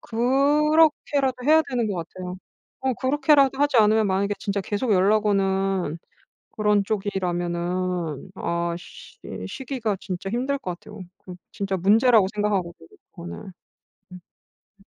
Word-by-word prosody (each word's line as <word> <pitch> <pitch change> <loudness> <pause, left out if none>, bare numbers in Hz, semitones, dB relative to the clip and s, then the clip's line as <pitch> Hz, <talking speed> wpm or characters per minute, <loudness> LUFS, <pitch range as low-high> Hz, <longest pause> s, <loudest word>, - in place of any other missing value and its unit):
그렇게라도 280 +2 +2
해야 315 +3 +5
되는 240 -4 -1
것 200 - -3
같아요. 180 0 -8 0.4
어 265 0 0
그렇게라도 270 +1 +3
하지 290 -2 +2
않으면 215 0 +4
만약에 200 +2 0
진짜 200 0 -2
계속 205 +4 -1
연락 205 +3 +3
오는 195 -4 0 0.5
그런 210 -1 +2
쪽이라면은 180 -4 -2
아 170 -2 -2
쉬 180 - -14 0.3
쉬기가 255 -6 -3
진짜 185 +1 -5
힘들 260 +5 -1
것 180 -9 -6
같아요. 210 +1 -12 0.2
그거 180 -1 -11 0.2
진짜 195 -1 -2
문제라고 215 +3 +4
생각하거든요 190 - -2 0.2
그거는. 85 0 -8 0.7
음. 180 - -10 0.6
음. - - -22
205 Hz, 295 characters per minute, -24 LUFS, 185-255 Hz, 0.7 s, 해야